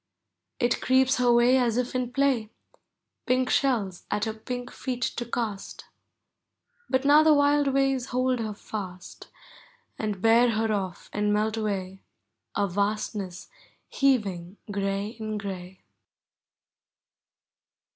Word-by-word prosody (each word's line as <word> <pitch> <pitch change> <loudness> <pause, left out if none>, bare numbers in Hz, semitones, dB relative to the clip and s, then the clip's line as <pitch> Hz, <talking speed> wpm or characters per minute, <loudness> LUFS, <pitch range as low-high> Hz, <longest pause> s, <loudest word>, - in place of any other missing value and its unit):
It 240 -2 +1
creeps 260 +1 +3
her 245 -1 +3
way 240 +2 +5
as 235 -2 +1
if 250 -1 -1
in 250 -1 -2
play. 260 -5 +1 0.8
Pink 255 0 +2
shells 215 -10 0
at 210 0 0
her 220 - -2
pink 245 +3 -6
feet 250 -2 -4
to 240 - -2
cast; 220 -5 -4 1.0
But 260 +1 +1
now 295 +2 +7
the 310 -1 +5
wild 285 0 +3
waves 270 -2 +1
hold 255 0 0
her 215 -2 -3
fast, 185 -4 -8 0.7
And 210 -3 -2
bear 230 +4 +5
her 220 0 0
off 190 -3 -4
and 210 0 +1
melt 215 +1 +1
away, 195 -3 -3 0.5
A 205 -1 +1
vastness 200 -1 -2 0.4
heaving 200 -9 0
gray 195 +1 -1
in 215 -1 -3
gray. 190 -2 -7
225 Hz, 125 wpm, -26 LUFS, 200-255 Hz, 1.0 s, now